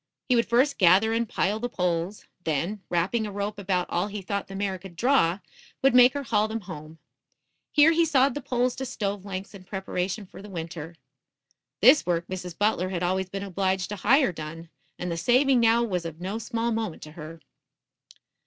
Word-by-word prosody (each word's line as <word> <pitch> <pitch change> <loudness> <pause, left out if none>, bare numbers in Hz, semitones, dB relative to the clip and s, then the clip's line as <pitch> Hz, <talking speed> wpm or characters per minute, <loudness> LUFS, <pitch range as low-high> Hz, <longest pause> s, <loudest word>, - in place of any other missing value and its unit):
He 250 - +5
would 235 - +2
first 255 +5 +2
gather 195 +4 +5
and 230 -1 0
pile 205 +3 0
the 245 +2 -3
poles; 180 -1 -2 0.2
then, 170 +7 -2
wrapping 190 +6 0
a - - -6
rope 205 +1 -4
about 185 -2 -1
all 175 +3 0
he 205 -1 -6
thought 200 +1 -3
the 195 - -9
mare 195 -1 -2
could 180 -1 -12
draw, 205 -5 +2 0.4
would 270 - +5
make 250 0 +7
her 285 - -2
haul 215 -4 +1
them 220 +1 -4
home. 160 -4 -9 0.7
Here 300 +2 +6
he 335 +1 +3
sawed 280 -4 +3
the 290 - -5
poles 250 0 0
to 265 - -3
stove 200 -4 -3
lengths 195 0 -6
in 195 -2 -11
preparation 190 +1 -3
for 185 - -13
the 210 - -11
winter. 165 -2 -6 0.9
This 260 +8 +7
work 170 -1 -1
Mrs. 180 -2 -6
Butler 205 -3 +1
had 180 -2 -3
always 185 +1 0
been 195 +1 -5
obliged 190 -1 -1
to 205 - -4
hire 265 +4 +4
done, 165 0 -8 0.3
and 180 -1 -4
the 165 - -2
saving 255 +7 +3
now 230 0 +4
was 185 -7 -2
of 165 -1 -7
no 195 +5 -4
small 230 0 -2
moment 220 -7 -3
to 150 - -10
her. 160 0 -9
195 Hz, 200 wpm, -26 LUFS, 180-230 Hz, 0.9 s, make